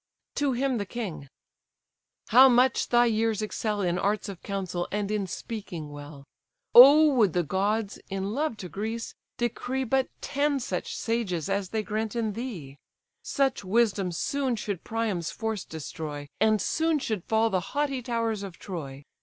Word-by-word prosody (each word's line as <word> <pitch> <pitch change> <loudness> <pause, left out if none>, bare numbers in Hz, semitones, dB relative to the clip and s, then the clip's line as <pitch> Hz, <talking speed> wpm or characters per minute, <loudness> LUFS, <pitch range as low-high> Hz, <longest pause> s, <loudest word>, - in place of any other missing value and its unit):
To 285 -2 0
him 255 -1 0
the 200 - -2
king: 190 -12 -5 1.0
"How 260 +4 +8
much 250 +1 +3
thy 240 0 +5
years 220 -1 +1
excel 210 -1 -2
In 180 -1 0
arts 205 +2 0
of 190 -3 -8
counsel, 185 -3 -3
and 205 0 -2
in 205 -2 -1
speaking 175 -5 -6
well! 145 -1 -10 0.5
O 290 +4 +9
would 215 -9 +3
the 175 - +1
gods, 200 +5 -1
in 195 +1 -3
love 285 -3 -1
to - - -4
Greece, 220 +5 -4 0.2
decree 245 +2 -2
But 265 +1 +1
ten 285 0 0
such 185 -8 -4
sages 205 -9 -2
as 195 -1 -1
they 220 +1 -1
grant 215 +1 -3
in 225 -3 -1
thee; 185 - -7 0.4
Such 270 -5 0
wisdom 200 -2 +1
soon 265 +8 -1
should 200 -5 -4
Priam's 220 -7 -2
force 220 -3 -3
destroy, 150 -2 -6
And 215 +1 +3
soon 320 0 +1
should 220 - -3
fall 225 0 +2
the 185 - +2 0.2
haughty 275 -3 0
towers 230 -3 -1
of 195 -3 -8
Troy! 145 -7 -7
215 Hz, 160 wpm, -27 LUFS, 185-240 Hz, 1.0 s, O